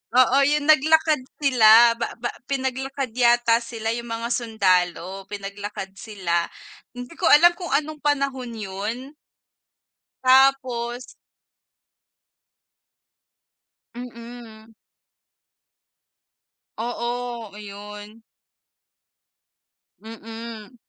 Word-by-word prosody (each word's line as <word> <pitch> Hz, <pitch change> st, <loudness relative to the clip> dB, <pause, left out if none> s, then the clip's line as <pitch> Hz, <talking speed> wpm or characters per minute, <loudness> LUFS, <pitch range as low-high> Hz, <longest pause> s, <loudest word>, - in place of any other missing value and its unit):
oo, 255 Hz, +1 st, +5 dB
yung 295 Hz, 0 st, +1 dB
naglakad 310 Hz, +1 st, +4 dB, 0.2 s
sila 235 Hz, -4 st, +6 dB
ba 235 Hz, -, -2 dB
ba 240 Hz, -, -1 dB, 0.2 s
pinaglakad 265 Hz, 0 st, -3 dB
yata 240 Hz, -1 st, +4 dB
sila 230 Hz, -1 st, -5 dB
yung 235 Hz, 0 st, -6 dB
mga 230 Hz, +1 st, -4 dB
sundalo, 190 Hz, -5 st, 0 dB
pinaglakad 200 Hz, -1 st, -7 dB
sila, 175 Hz, -6 st, -2 dB, 0.5 s
hindi 245 Hz, 0 st, -8 dB
ko -, -, -1 dB
alam 340 Hz, +4 st, +7 dB
kung 355 Hz, -1 st, -5 dB
anong 305 Hz, +1 st, -1 dB
panahon 275 Hz, -4 st, -1 dB
'yon. 205 Hz, +2 st, -4 dB, 1.3 s
Tapos 255 Hz, -2 st, +3 dB, 2.9 s
Mm. 235 Hz, -2 st, -11 dB, 2.1 s
Oo, 240 Hz, -1 st, -4 dB
ayun. 210 Hz, +1 st, -10 dB, 1.8 s
Mm. 225 Hz, +1 st, -10 dB
235 Hz, 75 wpm, -23 LUFS, 215-255 Hz, 2.9 s, alam